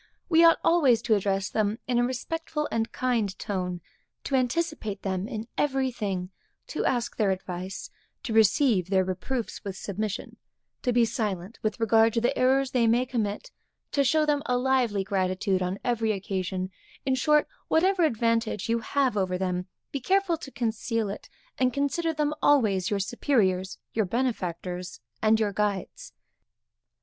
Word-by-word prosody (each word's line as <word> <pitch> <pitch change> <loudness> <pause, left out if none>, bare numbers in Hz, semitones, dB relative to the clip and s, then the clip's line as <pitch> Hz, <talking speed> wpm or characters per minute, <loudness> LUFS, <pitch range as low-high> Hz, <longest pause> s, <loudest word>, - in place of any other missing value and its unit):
We 330 -1 +6
ought 330 -1 +7
always 285 -9 +4
to 225 - +2
address 195 -1 +1
them 215 0 0
in 245 -1 +2
a - - +3
respectful 300 +5 -2
and 225 0 -1
kind 230 -6 0
tone; 180 -3 -3 0.4
to - - -5
anticipate 255 - -1
them 190 0 -2
in 225 -2 -5
every 270 -2 +1
thing; 195 -5 -3 0.4
to - - -2
ask 240 -2 0
their 210 -3 +2
advice; 185 0 -4 0.3
to 230 - -3
receive 220 - +4
their 190 -1 +3
reproofs 190 +7 -4
with 195 -2 -5
submission; 210 +2 -4 0.4
to 250 - +1
be 240 -1 +4
silent 210 -3 -3
with 215 0 -2
regard 225 0 +4
to 235 - +2
the 240 - +1
errors 265 +1 +2
they 240 -3 +3
may 240 +3 +3
commit; 235 - -3 0.4
to 280 - +2
show 305 +4 +3
them 295 -1 +1
a 250 - +2
lively 250 -6 +1
gratitude 190 0 0
on 180 +1 -1
every 230 -2 +1
occasion; 190 -1 -3 0.3
in 265 - +2
short, 300 +3 +3 0.2
whatever 370 +3 +3
advantage 230 - +1
you 230 0 +2
have 260 +1 0
over 185 -2 0
them, 180 -1 -2 0.2
be 280 - -2
careful 380 +5 +2
to 295 - -9
conceal 225 -3 -1
it, - - -9 0.3
and 255 -1 +2
consider 285 +4 0
them 300 -1 0
always 210 -10 +3
your 205 - 0
superiors, 190 -4 0 0.2
your 220 -2 +1
benefactors 180 -6 -3 0.2
and 220 0 +4
your 210 -2 0
guides. 200 - -2
225 Hz, 160 wpm, -27 LUFS, 195-260 Hz, 0.4 s, ought